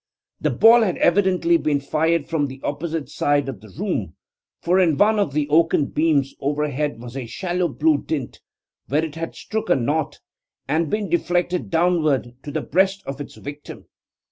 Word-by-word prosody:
The - - 0
ball 230 +1 +6
had 190 -6 0
evidently 190 - +3
been 150 - 0
fired 160 +2 0
from 150 -4 0
the 135 0 -9
opposite 155 +1 -3
side 145 -1 0
of 130 -8 -6
the 110 - -14
room, 125 - -3 0.4
for 180 +2 +2
in 165 -6 +3
one 215 +4 +4
of 200 -8 +1
the 145 0 0
oaken 160 -1 +3
beams 150 -4 +1
overhead 145 -2 -1
was 120 +1 -9
a 130 -3 -5
shallow 180 - -1
blue 155 0 +2
dint, 140 -5 -5 0.5
where 150 +4 +1
it 155 - -7
had 165 +1 -6
struck 220 -3 -4
a - - +5
knot 145 +4 -1 0.5
and 155 +3 0
been 210 +2 -1
deflected 175 0 0
downward 160 -7 +1
to - - -8
the - - -2
breast 190 +2 +1
of 135 +1 -5
its 145 - -9
victim. 145 +1 -9
155 Hz, 175 wpm, -22 LUFS, 145-175 Hz, 0.5 s, ball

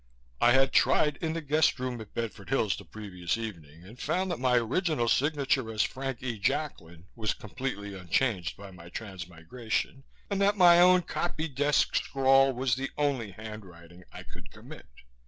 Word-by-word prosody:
I 120 - +6
had 135 0 +4
tried 150 -1 +3
in 160 -2 -2
the 165 -1 -4
guest 150 +1 +2
room 125 -2 -3
at 110 - -13
Bedford 110 -4 -5
Hills, 115 -7 +1
the - - -10
previous 90 -4 -4
evening, 85 -8 -8
and 110 +7 -14
found 185 +1 -1
that 170 - -3
my 125 -1 +2
original 125 - +1
signature 135 -3 +1
as 110 -2 +1
Frank 135 -1 -4
E. 120 -4 -3
Jacklin 85 -3 -3
was 110 -2 -2
completely 105 -3 -5
unchanged 90 -1 -1
by 100 -1 -10
my 85 -2 -13
transmigration, 100 +7 -5 0.2
and 200 -1 -2
that 200 +1 +3
my 175 -2 +7
own 180 0 +6
copy 165 -2 -3
desk 145 +1 +1
scrawl 135 0 +4
was 130 -1 0
the 135 +2 -2
only 140 -7 0
handwriting 90 -4 -11
I - - -9
could - - -13
commit. - - -13
120 Hz, 170 wpm, -29 LUFS, 100-140 Hz, 0.2 s, my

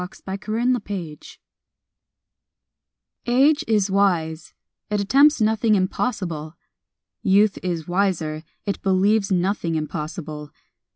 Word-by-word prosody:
_ 180 - -9
THE 190 - -3
CONQUEROR 210 -8 -2 2.0
Age 285 +5 +4
is 205 -3 +1
wise; 175 -5 0 0.3
it 210 0 0
attempts 275 +9 +4
nothing 220 0 +2
impossible. 185 -5 -2 0.7
Youth 200 0 +3
is 170 -4 -3
wiser; 175 -5 -1 0.2
it 200 - -3
believes 195 +2 +2
nothing 180 -2 0
impossible. 155 -1 -5
195 Hz, 95 wpm, -22 LUFS, 165-215 Hz, 2.0 s, Age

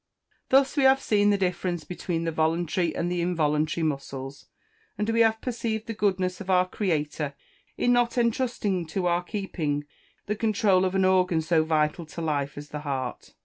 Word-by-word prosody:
] - - -42
Thus 270 +1 +4
we 285 - +2
have 265 0 +6
seen 205 -5 +2
the 205 - +3
difference 180 -2 -1
between 175 0 -3
the 165 - -1
voluntary 165 +2 0
and 175 +1 -1
the 175 -1 0
involuntary 160 -2 0
muscles, 140 -2 -4 0.5
and 210 - -1
we 225 0 +1
have 225 -1 +4
perceived 230 -3 -3
the 230 - -4
goodness 185 -3 0
of 195 - -8
our 185 -1 +4
Creator 150 -7 -2 0.4
in 245 - +3
not 245 0 +2
entrusting 230 -7 0
to 180 +3 -2
our 175 0 +2
keeping 175 -7 -3 0.4
the 210 - -1
controul 205 -4 +2
of 185 +1 -1
an 190 -1 +3
organ 185 -3 +3
so 160 -1 +3
vital 155 +1 0
to 165 - -9
life, 145 -4 -2
as 145 0 -8
the 150 - -5
heart. 135 -4 -4
180 Hz, 185 wpm, -26 LUFS, 155-210 Hz, 0.5 s, have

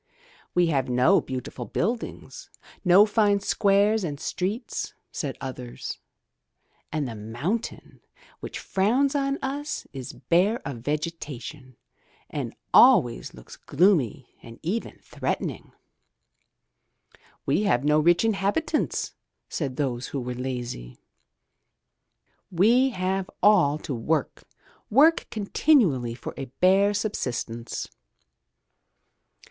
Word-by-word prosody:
'* - - -29
"We 180 0 +4
have 135 -2 0
no 125 +10 +4
beautiful 125 -1 -6
buildings, 225 - -4 0.3
no 185 +2 +7
fine 210 -2 +2
squares 200 +2 +2
and 145 -5 -4
streets,'* 205 +11 -3 0.2
said 140 -3 -4
others, 125 -2 -6 0.9
"and 150 -3 -1
the 120 - -5
mountain 120 - -4 0.4
which - - -6
frowns 245 +9 +1
on 275 -1 0
us 285 +3 -3
is 130 -1 -7
bare 190 +7 +2
of 135 -4 -5
vegetation 145 -2 -5 0.5
and - - -4 0.2
always 120 -1 +5
looks - - -12
gloomy 145 - +2 0.2
and 115 0 -12
even 200 +8 -3
threatening." - - -4 1.7
"We - - +2
have 125 -9 +2
no 150 +1 +4
rich 170 +6 +4
inhabitants," 220 +9 0 0.4
said 140 -5 -3
those 130 -3 -2
who 140 - -4
were 125 0 -4
lazy. 120 - -5 1.5
"We 230 +9 +4
have 190 -3 -2
all 180 -9 +5
to 155 - -5
work, 140 +5 -2 0.4
work 305 +9 +5
continually 200 - +2
for - - -7
a 135 - -4
bare 190 +9 +3
subsistence." 120 - -3
170 Hz, 105 wpm, -25 LUFS, 130-205 Hz, 1.7 s, no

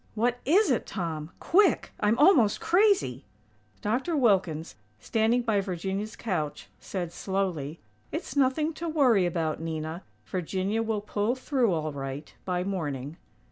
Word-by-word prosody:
"What 240 +2 +1
is 365 +3 +4
it, 245 - 0
Tom? 160 -5 -4
Quick!! 405 +4 +3
I'm 210 +2 +2
almost 270 - +5
crazy!!" 365 - +2 0.6
Dr. 260 +10 0
Wilkins, 185 - +2 0.3
standing 225 - +1
by 215 -4 +2
Virginia's 195 +3 -3
couch, 160 -10 -3
said, 175 -3 -4
slowly: 175 -6 -2 0.3
"It's 340 - -5
nothing 285 +4 +2
to 340 - -1
worry 250 - +4
about, 165 -3 -1
Nina. 160 +1 -4 0.2
Virginia 190 +4 -1
will 220 -2 -1
pull 210 +3 -1
through 255 -4 +1
all 155 -2 -1
right, 135 +1 -6
by 180 -1 -1
morning." 155 -6 -3
200 Hz, 135 wpm, -28 LUFS, 165-245 Hz, 0.6 s, almost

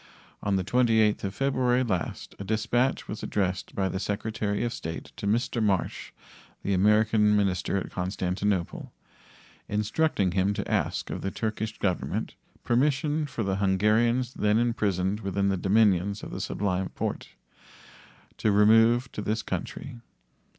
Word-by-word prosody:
On 100 -1 0
the 95 - +1
28th 110 -1 +3
of 95 - -4
February 130 -2 +2
last 95 -8 -3
a - - -4
dispatch 120 +5 0
was 105 - -6
addressed 95 -2 -2
by 95 -1 +1
the 95 - -3
Secretary 105 +1 -2
of 120 - -1
State 80 0 -6
to - - -4
Mr. 115 +2 0
Marsh, 100 -4 -1 0.5
the 100 - 0
American 105 +2 +4
minister 100 -2 +1
at 95 - -4
Constantinople, 95 0 -2 0.8
instructing 105 - +1
him 95 +2 +1
to - - -3
ask - - -1
of - - -4
the 95 - -2
Turkish 110 +1 -3
Government 95 -3 -2 0.3
permission 145 +4 +1
for 125 -4 -3
the 95 -1 -1
Hungarians 110 +6 +2
then 105 +1 +2
imprisoned 105 -4 0
within 100 -1 0
the 95 - +1
dominions 100 0 +2
of - - -7
the - - -5
Sublime 95 -2 -1
Porte - - -4 1.1
to 110 - +2
remove 115 +4 +5
to - - -5
this 110 +2 -1
country. 120 - -5
105 Hz, 145 wpm, -27 LUFS, 95-115 Hz, 1.1 s, remove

